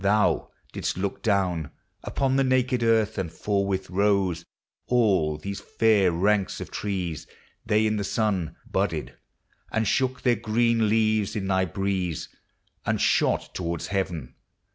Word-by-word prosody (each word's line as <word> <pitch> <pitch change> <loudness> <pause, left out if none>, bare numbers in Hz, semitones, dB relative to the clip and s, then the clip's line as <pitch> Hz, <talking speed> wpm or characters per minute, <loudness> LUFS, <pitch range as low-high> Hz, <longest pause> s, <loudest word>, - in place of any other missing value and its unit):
Thou 105 0 +2 0.2
didst - - -2
look 95 +1 -3
down 90 -8 +1 0.3
Upon 135 -1 0
the 135 - +3
naked 130 -1 +2
earth, 110 -2 +2
and 85 -4 -3
forthwith 100 0 -1
rose 95 -3 +1 0.4
All 95 -11 +2
these 100 +6 -5
fair 105 -5 +3
ranks 100 +3 +1
of - - -7
trees. 90 -7 -3 0.4
They 110 0 +3
in 110 0 +1
thy - - -1
sun 100 -4 -1
Budded, 90 -6 -2 0.6
and 110 -1 0
shook 130 +2 0
their 120 -3 +3
green 115 0 +2
leaves 110 -2 +2
in 100 -3 -2
thy 95 -1 +2
breeze, 95 -2 -2 0.5
And - - 0
shot - - +2
towards 85 -2 -3
heaven. 85 -10 -2
100 Hz, 140 wpm, -26 LUFS, 95-110 Hz, 0.6 s, the